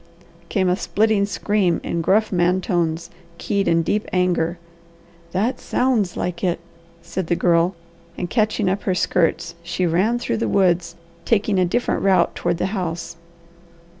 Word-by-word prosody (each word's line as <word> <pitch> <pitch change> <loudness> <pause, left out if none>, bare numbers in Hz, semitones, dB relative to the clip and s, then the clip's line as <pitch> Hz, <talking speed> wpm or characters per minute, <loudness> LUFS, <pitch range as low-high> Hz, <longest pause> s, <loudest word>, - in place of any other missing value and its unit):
came 190 -3 +1
a 180 - +3
splitting 210 0 +1
scream 200 -3 +1
in 170 - -2
gruff 210 +6 +2
man 180 0 +2
tones, 170 -3 -1 0.3
keyed 200 +1 -1
in 165 0 +3
deep 210 +6 -1
anger. 180 -2 +1 0.7
"That 210 +8 0
SOUNDS 230 -8 0
like 175 0 -3
it!" 175 -2 +1 0.4
said 185 -1 -4
the 175 - +2
Girl, 170 +1 +2 0.4
and 180 - -3
catching 215 -1 +1
up 195 +2 0
her 185 - +2
skirts 170 -2 +1
she 175 +1 -2
ran 185 +8 +2
through 115 - -2
the 115 - -1
woods, 175 - +2 0.3
taking 210 -3 +1
a 180 - +4
different 240 +8 0
route 185 -3 +3
toward 175 -1 -1
the - - -1
house. 170 -3 -3
180 Hz, 155 wpm, -21 LUFS, 170-205 Hz, 0.7 s, a